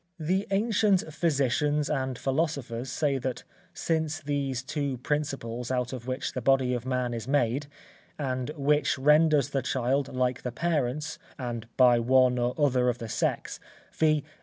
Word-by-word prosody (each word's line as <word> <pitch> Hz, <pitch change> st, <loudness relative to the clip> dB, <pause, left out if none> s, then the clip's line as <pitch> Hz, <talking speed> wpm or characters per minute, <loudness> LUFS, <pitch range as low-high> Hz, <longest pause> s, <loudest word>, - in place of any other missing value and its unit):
The 185 Hz, +6 st, 0 dB
ancient 200 Hz, -5 st, +2 dB
physicians 150 Hz, -1 st, +1 dB
and 130 Hz, -4 st, -2 dB
philosophers 135 Hz, -4 st, -2 dB
say 140 Hz, 0 st, 0 dB
that 125 Hz, -1 st, -4 dB, 0.3 s
since 160 Hz, -1 st, -1 dB
these 140 Hz, -4 st, -2 dB
two 140 Hz, -1 st, -2 dB
principles 125 Hz, -4 st, -3 dB
out 125 Hz, -1 st, -1 dB
of 125 Hz, -1 st, -7 dB
which 130 Hz, +2 st, -3 dB
the 130 Hz, -, -3 dB
body 130 Hz, 0 st, +3 dB
of 125 Hz, 0 st, -3 dB
man 125 Hz, -2 st, -1 dB
is 115 Hz, 0 st, -5 dB
made, 135 Hz, 0 st, +1 dB, 0.5 s
and 130 Hz, -2 st, -2 dB
which 145 Hz, 0 st, +2 dB
renders 150 Hz, 0 st, +4 dB
the 135 Hz, -, 0 dB
child 130 Hz, +1 st, 0 dB
like 125 Hz, -1 st, 0 dB
the 125 Hz, -, -4 dB
parents, 150 Hz, 0 st, -1 dB, 0.2 s
and 120 Hz, -3 st, -5 dB
by 125 Hz, -2 st, +6 dB
one 125 Hz, +1 st, +4 dB
or 120 Hz, +1 st, 0 dB
other 130 Hz, -4 st, +3 dB
of 120 Hz, -, -1 dB
the 115 Hz, -2 st, -7 dB
sex, -, -, -2 dB, 0.3 s
viz. 155 Hz, -2 st, +2 dB
135 Hz, 155 wpm, -28 LUFS, 125-150 Hz, 0.5 s, by